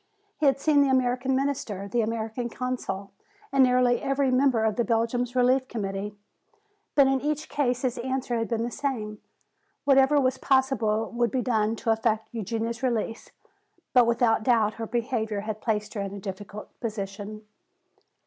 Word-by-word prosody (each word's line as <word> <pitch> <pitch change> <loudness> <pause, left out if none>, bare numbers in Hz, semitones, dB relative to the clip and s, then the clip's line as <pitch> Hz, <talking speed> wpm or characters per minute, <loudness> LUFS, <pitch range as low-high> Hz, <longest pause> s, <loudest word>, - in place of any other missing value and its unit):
He 305 - +3
had 275 0 +3
seen 290 0 +4
the 280 - +3
American 260 0 +1
Minister, 265 -8 -2
the 235 +4 +1
American 225 +2 -3
Consul 230 -6 -4 0.4
and 275 -1 +5
nearly 250 -1 +3
every 275 -1 +1
member 255 -3 +3
of 220 -2 +1
the 235 - +1
Belgian 230 +2 0
Relief 255 +1 +3
Committee. 205 -3 -4 0.8
But 280 - +7
in 270 -1 +2
each 300 +1 -2
case 250 -3 0
his 255 -2 -1
answer 260 -1 -2
had 230 -1 -1
been 230 -1 -1
the 240 - -3
same. 230 -7 -3 0.6
Whatever 275 +1 +5
was 260 -1 +1
possible 230 -5 +1
would 235 0 +1
be 255 -2 -1
done 220 -2 +1
to 225 - -1
effect 220 0 0
Eugenia's 230 +1 -3
release. 230 -3 -2 0.6
But 250 -3 +6
without 235 -1 +3
doubt 220 -2 +3
her 225 - -3
behavior 225 -3 -2
had 215 0 -5
placed 210 -2 -1
her 210 - -3
in 200 0 -4
a - - -6
difficult 200 +2 -7
position. 210 -1 -5
235 Hz, 165 wpm, -26 LUFS, 215-260 Hz, 0.8 s, But